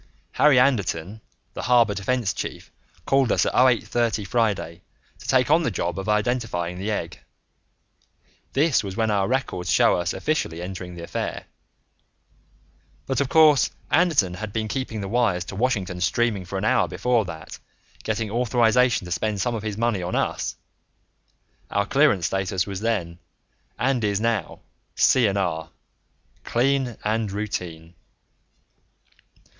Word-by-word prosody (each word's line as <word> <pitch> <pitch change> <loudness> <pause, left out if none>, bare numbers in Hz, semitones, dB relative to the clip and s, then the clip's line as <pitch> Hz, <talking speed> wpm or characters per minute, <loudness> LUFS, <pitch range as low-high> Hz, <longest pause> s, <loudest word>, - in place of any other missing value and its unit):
Harry 145 -3 +4
Anderton, 105 -6 +1 0.3
the - - -5
Harbor 120 -3 +4
Defense 110 +2 -1
chief, - - -6 0.3
called 135 -2 +2
us - - +2
at - - -1
0830 120 -3 +2
Friday 100 -6 -1 0.4
to - - -12
take 130 +1 +3
on 160 +2 +5
the 160 - 0
job 90 -3 -3
of 95 +2 -4
identifying 105 -6 -1
the 100 +3 -3
egg; 105 - -3 1.3
this 145 -2 +2
was 95 -1 -6
when 110 -1 +1
our 100 -2 +1
records 120 -9 -2
show - - +4
us 85 0 -1
officially 150 - -2
entering 90 0 -7
the 85 - -8
affair, - - -4 1.6
but, 135 0 -1
of 135 - -1
course, 155 -3 +5 0.2
Anderton 155 - +3
had 105 +3 -6
been 110 +1 -2
keeping 115 -2 -4
the 100 - -4
wires 100 -5 +1
to - - -8
Washington 100 -6 -1
steaming 105 0 0
for 95 +2 -5
an 95 - -2
hour 130 +3 +3
before 125 -3 +1
that, 80 -2 -9 0.4
getting 110 -1 -2
authorization 120 -2 +2
to 90 - -9
spend 105 +3 -1
some 120 +4 0
of 115 - -3
his 105 -1 -4
money 115 -4 0
on 90 +1 -3
us - - -1 1.1
(our 100 0 0
clearance 120 - +3
status 95 -2 -1
was 100 -2 -5
then 95 -7 -2 0.6
and 125 -2 0
is 100 -1 +1
now 110 -6 -2 0.3
C&R 95 -9 +2 0.7
clean 130 0 0
and 110 -1 -1
routine). 90 -5 -5
110 Hz, 140 wpm, -24 LUFS, 95-125 Hz, 1.6 s, on